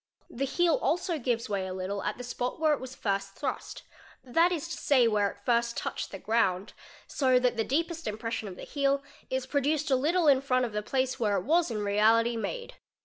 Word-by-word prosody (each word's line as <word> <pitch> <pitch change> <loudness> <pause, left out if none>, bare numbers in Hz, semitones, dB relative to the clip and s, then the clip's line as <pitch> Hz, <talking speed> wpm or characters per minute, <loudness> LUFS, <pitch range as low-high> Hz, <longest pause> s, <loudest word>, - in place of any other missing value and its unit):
The 270 +3 -2
heel 340 +3 +2
also 340 -1 0
gives 235 -2 -1
way 195 -3 -2
a 185 - -5
little 190 +2 -3
t - - -1
the 250 - -7
spot 245 +2 -3
where 310 -1 +3
it 290 - -1
was 260 0 -8
first 195 -1 -2
thrust, 275 -3 -5 0.4
that 330 +8 +3
is 335 -2 -2
to - - -3
say, 255 -5 +4
where 205 -2 +2
it 200 - -14
first 235 -1 +1
touched - - -3
6 195 - -10
ground, 205 -4 +1 0.3
so 260 -3 +2
that 250 0 +2
the 225 - 0
deepest 330 +5 -2
impression 220 +1 -3
of 185 - -7
the - - -10
heel 280 -1 0 0.3
is 260 0 -1
produced 290 +2 0
a - - +6
little 320 +6 +2
il 270 -2 +6 0.2
of 235 - -5
the 210 0 -2
place 260 +4 -1
where 210 -3 +1
it - - -2
was 330 +2 +2
in 215 -3 -3
reality 225 +3 +3
made. 475 - -5
250 Hz, 215 wpm, -29 LUFS, 215-285 Hz, 0.4 s, a